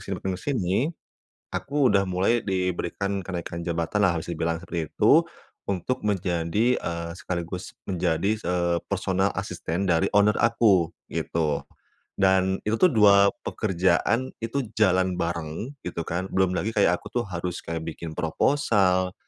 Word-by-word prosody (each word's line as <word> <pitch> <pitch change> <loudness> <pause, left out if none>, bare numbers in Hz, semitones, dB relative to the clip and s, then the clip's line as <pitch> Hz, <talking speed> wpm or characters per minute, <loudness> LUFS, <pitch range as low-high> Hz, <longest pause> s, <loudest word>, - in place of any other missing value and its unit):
sini - - -4
makin 95 - -1
ke - - -13
sini, 95 -11 0 0.8
aku 140 -2 +1
udah 100 -1 +4
mulai 95 +6 +2
diberikan 95 +1 -2
kenaikan 85 -2 -5
jabatan 85 +4 -1
lah 85 -3 +3
bisa 85 +1 -5
dibilang 85 +1 -1
seperti 85 -4 -4
itu, - - +5 0.5
untuk 100 +8 -2
menjadi, 95 +4 +1
eee, 85 0 -3
sekaligus 90 0 -5 0.2
menjadi 90 +1 0
se 105 -4 -4 0.4
personal 95 0 +1
asisten 90 +4 -3
dari 85 -2 +2
owner 105 +1 +4
aku 105 -8 +3 0.2
gitu, 75 -3 -1 0.6
dan 95 0 +3
itu 110 - +2
tuh 185 - +6
2 100 -2 +6
pekerjaan 110 +6 +1
itu 125 +2 -2
jalan 95 -3 +3
bareng 85 - -3
gitu 90 -1 -3
kan 90 +3 -2
belum 95 -1 +2
lagi 110 - -1
kayak 90 -3 +3
aku - - -9
tuh - - -6
harus 90 0 -4
kayak 80 0 -3
bikin 80 0 -6
proposal, 95 - +2
95 Hz, 145 wpm, -25 LUFS, 85-105 Hz, 0.8 s, tuh